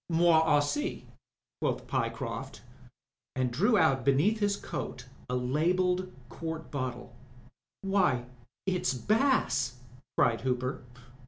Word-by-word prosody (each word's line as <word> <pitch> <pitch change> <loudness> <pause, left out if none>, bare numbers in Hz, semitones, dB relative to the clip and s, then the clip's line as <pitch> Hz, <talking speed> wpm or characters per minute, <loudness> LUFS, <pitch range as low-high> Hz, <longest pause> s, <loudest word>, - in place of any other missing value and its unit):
" - - -63
Moi 170 +1 +4
aiLssi/' 145 -2 +1 0.6
quoth - - -1
Pyecroft, - - -3 0.7
and 130 -1 0
drew 205 - +3
out 140 -8 +3
beneath 150 - +3
his 205 -1 +1
coat 125 0 -5 0.2
a 125 - 0
labelled 180 +8 +1 0.2
quart 160 +5 -6
bottle. 125 -3 -4 0.7
"Why, 185 -11 +2 0.4
it*s 185 -8 0
Bass," 210 - +1 0.4
cried 115 - +3
Hooper. 130 0 -1
150 Hz, 105 wpm, -30 LUFS, 130-185 Hz, 0.7 s, Moi